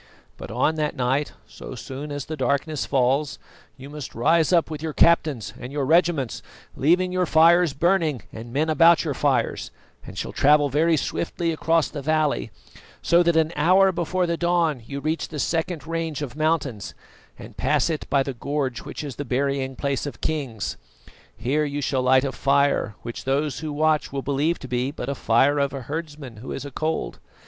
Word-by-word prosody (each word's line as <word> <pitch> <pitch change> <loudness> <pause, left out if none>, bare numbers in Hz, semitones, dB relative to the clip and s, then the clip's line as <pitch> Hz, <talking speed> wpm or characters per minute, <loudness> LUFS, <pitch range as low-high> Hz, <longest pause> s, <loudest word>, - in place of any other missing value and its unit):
"But - - -9
on 160 +1 +1
that 150 -1 -1
night, 135 +2 0
so - - -10
soon 140 +3 -7
as 145 -2 -4
the 155 - -5
darkness 140 +2 -1
falls, 135 +1 +1 0.4
you 135 - -10
must 150 -1 -8
rise 160 +8 +3
up 170 -2 +3
with 150 -1 -5
your 160 -1 -3
captains 155 -9 +2
and 125 - -7
your 140 -1 -1
regiments, 160 -5 +2 0.3
leaving 180 +6 +2
your 180 -1 0
fires 165 0 +5
burning 160 - +1
and 115 +1 -8
men 150 +5 0
about 165 +1 +5
your 155 -4 -2
fires, - - 0 0.3
and - - -11
shall - - -4
travel 145 0 +4
very 160 +4 +2
swiftly 165 +3 -2
across 165 0 +1
the 145 - -7
valley, 155 0 0 0.5
so 170 +1 +4
that 170 -1 +2
an 160 +1 +2
hour 185 +6 +4
before 180 +1 -1
the 170 -1 -1
dawn 170 -6 +1
you 140 0 -5
reach 155 +3 -2
the 155 - -8
second 165 +2 -2
range 165 -2 -3
of 135 -2 -6
mountains, 155 -9 -1 0.4
and - - -11
pass - - +1
it 160 -3 -3
by 140 -1 +3
the 135 - -4
gorge 135 0 -2
which - - -7
is 140 -4 -7
the 145 - -3
burying 135 0 -1
place 140 0 -2
of 145 - -8
kings. 135 -9 -3 0.6
Here 140 +5 0
you 145 -1 -3
shall 135 -2 0
light 130 +1 +4
a 135 - -1
fire, 140 -7 +1
which 120 +1 -7
those 140 +1 0
who 155 -1 -4
watch 155 +1 +1
will 135 -1 -3
believe 145 +5 0
to 130 - -7
be 125 +1 -1
but 140 - -6
the 140 - -2
fire 135 +3 +2
of 140 0 0
a 135 - -5
herdsman 145 -3 -6
who 115 - -8
is 135 - -6
acold. 155 +3 -3
145 Hz, 190 wpm, -24 LUFS, 135-160 Hz, 0.6 s, fires